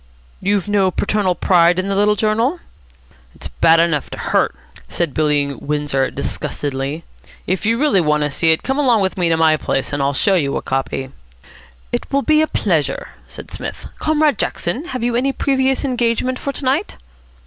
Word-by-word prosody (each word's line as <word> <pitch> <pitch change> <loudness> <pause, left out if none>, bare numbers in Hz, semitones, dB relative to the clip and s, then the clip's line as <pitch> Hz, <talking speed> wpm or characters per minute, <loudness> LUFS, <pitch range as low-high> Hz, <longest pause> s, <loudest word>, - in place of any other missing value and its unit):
"You've 200 0 0
no 200 -2 +2
paternal 195 -1 0
pride 175 -1 +3
in 185 +1 -1
the 195 - -1
little 210 +1 +3
journal?" 225 - 0 0.8
"It's - - -8
bad 165 0 +4
enough 165 -4 +1
to - - -7
hurt," - - 0 0.3
said 165 - -2
Billy 145 -2 +1
Windsor 145 -2 -1
disgustedly. 140 +3 -4 0.4
"If 190 +4 -1
you 230 +1 +2
really 245 -9 +3
want 150 -2 +1
to 150 - -1
see 165 +3 +1
it, 160 - +2
come 265 +2 -1
along 245 -7 +3
with 190 - -1
me 175 -3 +1
to 165 - +2
my 160 -1 +4
place, 135 -1 -2
and 145 - -1
I'll 140 +1 +1
show 200 +7 +2
you 145 -7 +1
a - - -3
copy." 135 0 -3 0.8
"It - - -3
will 280 0 +1
be 310 0 +4
a 315 - +2
pleasure," - - -1 0.2
said - - -10
Psmith. - - -7
"Comrade 305 -4 +2
Jackson, 235 - -2
have 255 -8 -5
you 240 0 0
any 265 +3 +1
previous 270 0 0
engagement 250 0 0
for 280 - -3
to 275 - -6
night?" 280 +10 0
195 Hz, 185 wpm, -18 LUFS, 150-255 Hz, 0.8 s, bad